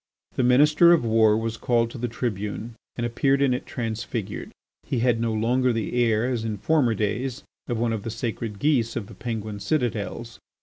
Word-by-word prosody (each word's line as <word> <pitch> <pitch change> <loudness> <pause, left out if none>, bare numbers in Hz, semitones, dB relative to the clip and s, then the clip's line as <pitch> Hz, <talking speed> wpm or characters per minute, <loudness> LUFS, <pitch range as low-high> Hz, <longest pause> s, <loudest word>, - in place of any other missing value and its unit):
The - - 0
Minister 150 +7 +6
of 160 -8 +2
War 110 -1 +4
was 115 0 -3
called 115 -1 +1
to 125 - -8
the 120 - -1
tribune 110 -1 -4 0.2
and 120 - -2
appeared 135 +4 +1
in 140 -2 +3
it 125 - -4
transfigured. 115 -2 -4 0.3
He 130 - -3
had 120 -2 +2
no 115 -1 0
longer 125 +4 +2
the 115 -3 -2
air, 110 0 +2
as 125 -3 -1
in 110 -2 -3
former 125 -1 +2
days, 120 +7 -2 0.2
of 120 - -2
one 115 0 0
of 110 - -3
the 115 - -5
sacred 115 -2 -4
geese 120 -4 +1
of 115 - -3
the - - -12
Penguin 110 -3 -5
citadels. 115 -4 -2
115 Hz, 190 wpm, -25 LUFS, 110-125 Hz, 0.3 s, Minister